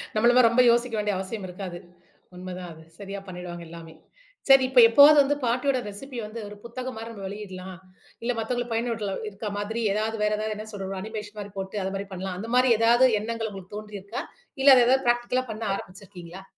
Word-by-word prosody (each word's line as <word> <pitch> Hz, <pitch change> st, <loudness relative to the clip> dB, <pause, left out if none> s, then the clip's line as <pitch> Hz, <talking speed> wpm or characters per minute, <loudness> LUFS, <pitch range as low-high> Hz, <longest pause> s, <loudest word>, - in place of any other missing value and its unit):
நம்மள 235 Hz, +3 st, +5 dB
மாரி 250 Hz, -2 st, +7 dB
ரொம்ப 235 Hz, +2 st, +4 dB
யோசிக்க 240 Hz, 0 st, +1 dB
வேண்டிய 210 Hz, -1 st, 0 dB
அவசியம் 190 Hz, +2 st, -5 dB
இருக்காது. 180 Hz, -1 st, -7 dB, 0.6 s
உண்ம 180 Hz, 0 st, -7 dB
தான் 180 Hz, -2 st, -8 dB
அது. 160 Hz, 0 st, -15 dB, 0.2 s
சரியா 200 Hz, 0 st, -6 dB
பண்ணிடுவாங்க 175 Hz, -1 st, -7 dB
எல்லாமே. 165 Hz, -1 st, -11 dB, 0.6 s
சரி, 270 Hz, -1 st, +8 dB
இப்ப 260 Hz, -1 st, +5 dB
எப்பவாவது 285 Hz, +5 st, +8 dB
வந்து 285 Hz, +1 st, 0 dB
பாட்டியோட 255 Hz, +3 st, +1 dB
ரெசிபி 255 Hz, +6 st, -9 dB
வந்து 215 Hz, +2 st, -8 dB
ஒரு 205 Hz, -, -10 dB
புத்தகம் 255 Hz, +2 st, -6 dB
மாரி 225 Hz, +1 st, -7 dB
நம்ம 205 Hz, -3 st, -9 dB
வெளியிடலாம், 190 Hz, -2 st, -8 dB, 0.5 s
இல்ல 240 Hz, -, 0 dB
மத்தவங்களுக்கு 245 Hz, +1 st, -2 dB
பயனுட்டலா 225 Hz, -3 st, -2 dB, 0.2 s
இருக்க 205 Hz, +1 st, -6 dB
மாதிரி 215 Hz, +3 st, -3 dB
ஏதாவது 215 Hz, +2 st, -1 dB
வேற 210 Hz, -, +2 dB
ஏதாவது 215 Hz, 0 st, -3 dB
என்ன 215 Hz, -, -7 dB
சொல்றது 195 Hz, -2 st, -5 dB
அனிமேஷன் 210 Hz, 0 st, -7 dB
மாரி 205 Hz, 0 st, -7 dB
போட்டு, 190 Hz, +1 st, -6 dB
அது 190 Hz, +1 st, -3 dB
மாதிரி 195 Hz, 0 st, -4 dB
பண்ணலாம். 185 Hz, 0 st, -5 dB
அந்த 225 Hz, +3 st, -6 dB
மாரி 250 Hz, 0 st, +4 dB
ஏதாவது 235 Hz, +3 st, +5 dB, 0.2 s
எண்ணங்கள் 225 Hz, 0 st, -3 dB
உங்களுக்குத் 195 Hz, +1 st, -9 dB
தோன்றியிருக்கா? 210 Hz, 0 st, -7 dB, 0.4 s
இல்ல 275 Hz, 0 st, +9 dB
அது 250 Hz, -, +6 dB
ஏதாவது 265 Hz, +1 st, +3 dB
ப்ராக்டிகல்லா 240 Hz, +1 st, +1 dB
பண்ண 220 Hz, +1 st, -6 dB
ஆரம்பிச்சு 190 Hz, 0 st, -9 dB
இருக்கீங்களா? 180 Hz, -1 st, -11 dB
215 Hz, 195 wpm, -25 LUFS, 190-240 Hz, 0.6 s, இல்ல